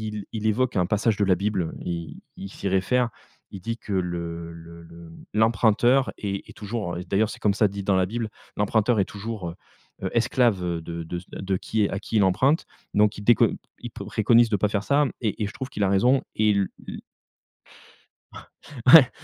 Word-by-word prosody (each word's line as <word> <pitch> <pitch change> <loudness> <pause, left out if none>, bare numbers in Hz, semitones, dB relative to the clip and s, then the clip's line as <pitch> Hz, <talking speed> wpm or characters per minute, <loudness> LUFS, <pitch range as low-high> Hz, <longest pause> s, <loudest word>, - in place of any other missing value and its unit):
il 105 -2 -6
il 110 -1 -2
évoque 120 +4 +1
un 90 - +3
passage 105 +2 +1
de 105 - +2
la 95 -1 +4
Bible. 95 -4 -2
Il 85 -2 -5 0.2
il 95 - -7
s'y 100 - -5
réfère, 115 +6 +1 0.4
il 95 - -8
dit 115 +5 -3
que: 105 -2 -6
"Le 85 -2 -3
le 85 0 -12
le 85 0 -13 0.2
l'emprunteur 115 +4 +3
est 100 -1 -4
est - - -11
toujours 105 -4 -4
d'ailleurs, 105 +2 +2
c'est - - -8
comme 105 - +2
ça 105 - +4
dit 100 0 -6
dans 95 0 +2
la 95 - +3
Bible: 115 +2 -3 0.3
l'emprunteur 110 +2 +2
est 95 - +3
toujours, 105 -3 -6
heu 85 - -9 0.5
heu, - - -1
esclave, 115 -4 +2
heu, 85 -1 -2
de 85 0 -6
de 85 +2 -5
c 90 - -15
de 95 0 -2
qui 110 +3 -1
est 100 - +1
à 100 - -3
qui 110 - -6
il 105 - +5
emprunte". 130 - +2 0.3
Donc 105 0 +3
il - - -7
déco 120 +1 +5 0.3
il - - -8
préconise 115 +2 +2
de 110 - +2
pas 105 +2 +1
faire 100 -1 -1
ça, 145 +5 +3 0.2
et 110 -1 -1
et - - -1
je 105 - -9
trouve 130 - -6
qu'il 105 - -2
a 95 - +2
raison. 120 +8 +3
Et 110 0 +3 0.4
Il - - -7 1.9
Ouais, 145 -7 +10
105 Hz, 205 wpm, -25 LUFS, 95-115 Hz, 1.9 s, Ouais